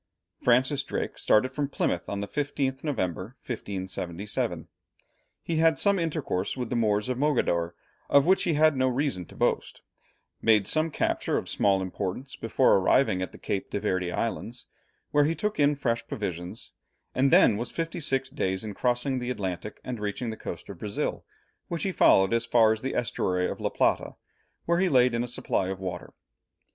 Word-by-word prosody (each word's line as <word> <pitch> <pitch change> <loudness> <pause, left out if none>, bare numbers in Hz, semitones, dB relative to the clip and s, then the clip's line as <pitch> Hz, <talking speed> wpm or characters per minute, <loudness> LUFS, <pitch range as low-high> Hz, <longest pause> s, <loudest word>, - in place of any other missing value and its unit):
Francis 130 +3 +3
Drake - - -4
started 120 +4 +3
from 145 +1 -2
Plymouth - - -1
on 100 0 -3
the 100 - -3
15th 135 -1 -2
November, 110 - -2
1577. 95 -3 -4 0.8
He 165 - -1
had 165 0 +4
some 200 -2 +3
intercourse 150 - -2
with 125 -3 -4
the - - 0
Moors 105 -2 +1
of 125 -1 -2
Mogador, 85 - +1 0.3
of 140 -1 +5
which 190 +2 +4
he 170 -4 +1
had 155 0 +4
no 130 0 +2
reason 130 - -1
to - - -15
boast, - - -1 0.6
made 110 -3 +4
some 155 +7 +1
captures - - 0
of - - -4
small 95 -2 +2
importance 100 +8 -4
before 115 0 +3
arriving 95 0 +3
at 95 - -3
the - - -12
Cape 100 - -3
de - - -2
Verd 95 -3 0
Islands, 115 +6 -3 0.5
where 145 0 +4
he 165 +2 +1
took 210 -1 -2
in 145 0 +4
fresh 115 -4 -1
provisions, 90 -4 -5 0.4
and 135 +1 +3
then 110 - +6
was 120 +4 -3
fifty 165 +1 -3
six 135 -4 0
days 95 -8 -1
in 105 -2 -5
crossing 125 +4 0
the 125 0 -4
Atlantic 100 -3 -4
and 125 -3 -5
reaching 105 +3 -3
the - - -5
coast 85 -5 -7
of 95 -4 -8
Brazil, 105 -2 -3 0.4
which 170 -3 -3
he 195 - 0
followed 95 - +5
as 115 0 +1
far 115 -2 +5
as 110 - -6
the 135 - -3
estuary 90 -6 0
of - - -5
La - - 0
Plata, - - +1 0.5
where 170 +1 +2
he 190 0 +3
laid 125 -4 +4
in 120 0 0
a - - -4
supply 115 -5 -1
of 95 0 -4
water. 90 -2 -5
120 Hz, 185 wpm, -27 LUFS, 100-140 Hz, 0.8 s, then